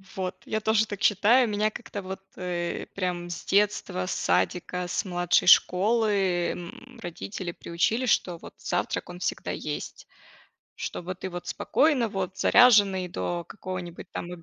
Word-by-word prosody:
Вот, 185 -1 -3
я 220 - -1
тоже 220 0 +2
так 205 -1 -6
считаю. 225 +5 +5
Меня 210 0 +1
как-то 205 -1 -7
вот, 190 0 -7
э, 175 -1 -3
прям 180 -2 -2
с 175 - -6
детства, 200 - +1
с - - -3
садика, 175 - 0
с 175 - -1
младшей 175 -2 +1
школы, 195 -2 +4
м, 175 -1 -10
родители 175 +1 -5
приучили, 180 +10 -1
что 180 -6 +2
вот - - -12
завтрак, - - -2
он 175 0 -8
всегда 180 - -2
есть. 150 - -6 0.7
Чтобы 180 +1 -5
ты 190 - -5
вот 175 -1 -7
спокойно 280 -6 +2
вот 190 -2 -4
заряженный 205 -7 +5
до 175 0 -3
какого-нибудь 185 -3 -7
там 175 - -5
185 Hz, 145 wpm, -27 LUFS, 175-210 Hz, 0.7 s, считаю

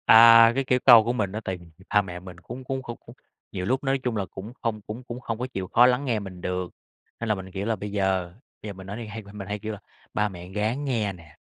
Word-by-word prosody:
À, 115 0 +9
cái 135 - +1
kiểu 125 -1 +2
câu 120 -4 +10
của 120 +2 0
mình 100 -6 -1
á, 110 +2 -4
tại 95 -2 -3
vì 85 - -15 0.3
ba 105 - +6
mẹ 90 -3 -7
mình 90 -1 -11
cũng 120 +8 -9
cũng 130 0 -3
không 120 -2 -7
cũng 120 - -13 0.4
nhiều 90 -2 -3
lúc 130 +7 0
nói 135 0 +1
chung 125 -3 -1
là 100 - -1
cũng 105 +5 -8
không 110 -3 -2
cũng 110 +5 -7
cũng 120 0 -7
hông 115 -2 -4
có 125 - -2
chịu 95 -1 -3
khó 120 +5 +6
lắng 125 +3 +2
nghe 115 -5 +1
mình 95 -3 -9
được, 90 0 -3 0.5
nên 115 - -3
là 110 - +3
mình, 95 -1 -8
kiểu 95 +2 -4
là, 115 0 +1
bây 105 0 -6
giờ 95 -3 0 0.3
bây 105 - -6
giờ - - -5
mình 95 0 -11
nói 100 +2 -5
thì 115 - -6
hay 110 +1 -7
mình 100 +1 -12
mình 95 -2 -6
hay 105 +1 -3
kêu 110 +1 -4
là 105 - -8 0.3
"Ba 105 0 +1
mẹ 90 -1 -10
ráng 110 +7 -1
nghe 110 -7 0
nè, 80 -4 -16
105 Hz, 295 wpm, -26 LUFS, 95-120 Hz, 0.5 s, câu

